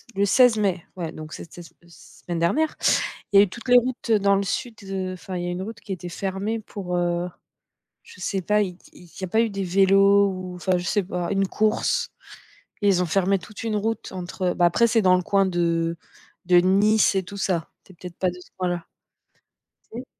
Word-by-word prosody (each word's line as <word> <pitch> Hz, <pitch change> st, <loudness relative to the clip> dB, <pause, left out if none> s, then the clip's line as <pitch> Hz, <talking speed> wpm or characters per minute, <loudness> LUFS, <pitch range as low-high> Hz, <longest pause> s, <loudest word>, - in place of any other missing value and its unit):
le 200 Hz, -, +2 dB
16 235 Hz, +2 st, +5 dB
mai, 190 Hz, -5 st, 0 dB
ouais, 170 Hz, -3 st, -4 dB
donc 155 Hz, 0 st, -9 dB
c'était, 175 Hz, -, -10 dB
heu, -, -, -10 dB, 0.2 s
se 170 Hz, -, -18 dB
semaine 175 Hz, -2 st, -3 dB
dernière? 300 Hz, -, +1 dB, 0.6 s
Il -, -, +4 dB
y -, -, +10 dB
a -, -, +8 dB
eu 205 Hz, -, -5 dB
toutes 240 Hz, +6 st, -11 dB
les 250 Hz, -, +7 dB
routes, 245 Hz, -1 st, -3 dB
heu, 220 Hz, -, +5 dB
dans 200 Hz, 0 st, +3 dB
le 195 Hz, -, 0 dB
sud, 235 Hz, +4 st, -3 dB
heu, 190 Hz, -1 st, -3 dB
enfin 185 Hz, 0 st, -7 dB
il 175 Hz, -, -3 dB
y -, -, -3 dB
a -, -, -2 dB
une 180 Hz, +1 st, -4 dB
route 225 Hz, +3 st, -7 dB
qui 195 Hz, -, -7 dB
était 180 Hz, -1 st, -6 dB
fermée 195 Hz, +5 st, -3 dB
pour, 185 Hz, -4 st, -5 dB
heu, 175 Hz, 0 st, 0 dB, 0.8 s
je -, -, -16 dB
sais 195 Hz, 0 st, -2 dB
pas, 210 Hz, +3 st, +2 dB
il 180 Hz, -3 st, -3 dB, 0.2 s
il 175 Hz, -, -16 dB
y 190 Hz, -, -7 dB
a -, -, -1 dB
pas 220 Hz, +6 st, +2 dB
eu 230 Hz, -, +1 dB
des 200 Hz, -1 st, -4 dB
vélos 195 Hz, +2 st, +4 dB
ou? 185 Hz, -1 st, -7 dB
Enfin 180 Hz, +1 st, 0 dB
je 175 Hz, -, -4 dB
sais 200 Hz, +3 st, +1 dB
pas, 180 Hz, 0 st, -3 dB
une 195 Hz, 0 st, +1 dB
course? 215 Hz, +3 st, 0 dB, 0.7 s
Et 205 Hz, -, +2 dB
ils 180 Hz, -2 st, +3 dB
ont -, -, -1 dB
fermé 195 Hz, +3 st, +1 dB
toute 205 Hz, +6 st, -10 dB
une 225 Hz, -2 st, -1 dB
route 225 Hz, +2 st, -2 dB
entre, 185 Hz, 0 st, -6 dB
heu -, -, -2 dB
bah, 175 Hz, -, +2 dB
après, 235 Hz, +7 st, +4 dB
c'est 225 Hz, -1 st, +2 dB
dans 185 Hz, -1 st, +5 dB
le 180 Hz, -, -2 dB
coin 195 Hz, +1 st, +2 dB
de 170 Hz, -2 st, 0 dB, 0.5 s
de 180 Hz, 0 st, +5 dB
Nice 200 Hz, +5 st, +4 dB
et 190 Hz, -, +2 dB
tout 200 Hz, +2 st, -9 dB
ça. 175 Hz, -4 st, -1 dB
Tu -, -, -18 dB
es -, -, -22 dB
peut-être 175 Hz, 0 st, -10 dB
pas 185 Hz, -, +1 dB
de 175 Hz, -, -7 dB
ce 180 Hz, -, -16 dB
coin 185 Hz, -1 st, -1 dB
là. 175 Hz, -1 st, -3 dB, 1.1 s
Si? 245 Hz, +3 st, -6 dB
190 Hz, 240 wpm, -24 LUFS, 175-205 Hz, 1.1 s, y